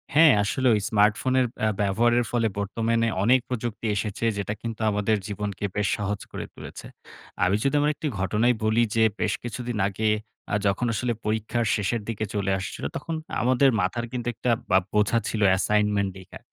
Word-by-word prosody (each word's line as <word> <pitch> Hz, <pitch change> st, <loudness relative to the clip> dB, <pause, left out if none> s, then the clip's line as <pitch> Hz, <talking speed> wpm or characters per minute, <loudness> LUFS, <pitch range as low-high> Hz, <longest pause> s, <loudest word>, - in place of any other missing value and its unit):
হ্যাঁ 155 Hz, 0 st, +8 dB
আসলেও, 125 Hz, +4 st, +2 dB, 0.2 s
স্মার্টফোনের 115 Hz, +4 st, +3 dB, 0.2 s
আ -, -, +3 dB
ব্যবহারের 120 Hz, +4 st, +2 dB
ফলে 115 Hz, -2 st, +2 dB
বর্তমানে 115 Hz, +3 st, 0 dB, 0.2 s
অনেক 125 Hz, +5 st, +5 dB
প্রযুক্তি 120 Hz, -3 st, -4 dB
এসেছে 105 Hz, +3 st, -2 dB
যেটা 100 Hz, 0 st, -2 dB
কিন্তু 115 Hz, -1 st, -5 dB
আমাদের 105 Hz, +1 st, +1 dB
জীবনকে 105 Hz, -1 st, -4 dB
বেশ 105 Hz, -1 st, +1 dB
সহজ 105 Hz, -1 st, -2 dB
করে -, -, -5 dB
তুলেছে। -, -, -10 dB, 0.6 s
আমি 90 Hz, +2 st, +3 dB
যদি 140 Hz, +1 st, +1 dB
আমার 150 Hz, +1 st, +3 dB
একটি 155 Hz, -, -4 dB
ঘটনাই 105 Hz, +6 st, +2 dB
বলি 110 Hz, +2 st, +3 dB
যে 115 Hz, -, +4 dB, 0.2 s
বেশ -, -, +1 dB
কিছুদিন 120 Hz, 0 st, -4 dB
আগে 105 Hz, +2 st, -1 dB, 0.4 s
আ -, -, +4 dB
যখন 100 Hz, +5 st, 0 dB
আসলে 120 Hz, +3 st, -1 dB
পরীক্ষার 110 Hz, +2 st, -1 dB
শেষের 105 Hz, +3 st, -1 dB
দিকে 110 Hz, -1 st, -2 dB
চলে 100 Hz, -1 st, 0 dB
আসছিল, 95 Hz, -, -6 dB
তখন 165 Hz, +3 st, -4 dB, 0.3 s
আমাদের 130 Hz, +2 st, +4 dB
মাথার 95 Hz, +6 st, -1 dB
কিন্তু 125 Hz, -1 st, -4 dB
একটা 125 Hz, -, 0 dB, 0.2 s
বা -, -, +5 dB, 0.2 s
বোঝা 105 Hz, +2 st, +3 dB
ছিল 110 Hz, -, -2 dB, 0.2 s
assignment 105 Hz, 0 st, +1 dB
লেখা 95 Hz, 0 st, -12 dB
110 Hz, 165 wpm, -25 LUFS, 100-120 Hz, 0.6 s, হ্যাঁ